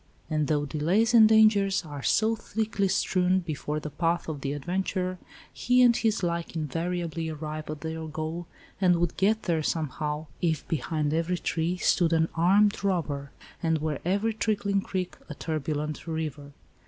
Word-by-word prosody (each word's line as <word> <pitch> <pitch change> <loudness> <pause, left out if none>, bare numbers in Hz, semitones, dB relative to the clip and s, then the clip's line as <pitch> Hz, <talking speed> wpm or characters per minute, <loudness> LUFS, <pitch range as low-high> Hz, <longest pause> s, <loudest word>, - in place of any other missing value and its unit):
And 155 -2 +1
though 150 -2 +1
delays 180 - +1
and 220 -2 +8
dangers 205 -4 +4
are 145 -2 -7
so 220 +9 +2
thickly 215 -2 -1
strewn 185 -1 +2
before 155 -2 -3
the 150 0 -6
path 165 +4 0
of 150 -3 -4
the 140 0 -2
adventurer, 185 +4 -2 0.3
he 250 +1 +3
and 240 -1 +6
his 220 -4 0
like 170 -1 -2
invariably 165 +1 -2
arrive 155 0 -5
at 155 -1 -5
their 160 0 -4
goal 160 +2 -4 0.3
and 180 -2 +5
would 170 -1 0
get 215 +3 +2
there 165 -2 +1
somehow, 150 0 -2 0.2
if 160 -4 0
behind 150 0 -1
every 165 +2 0
tree 170 +1 -1
stood 170 -2 +2
an 160 0 +2
armed 200 +5 +3
robber, 150 -8 -1 0.3
and 160 -1 +2
were 155 -2 -2
every 200 +5 +1
trickling 205 -2 0
creek 185 -2 -4
a 150 - -6
turbulent 150 0 -3
river. 150 -3 -4
165 Hz, 160 wpm, -27 LUFS, 155-190 Hz, 0.3 s, and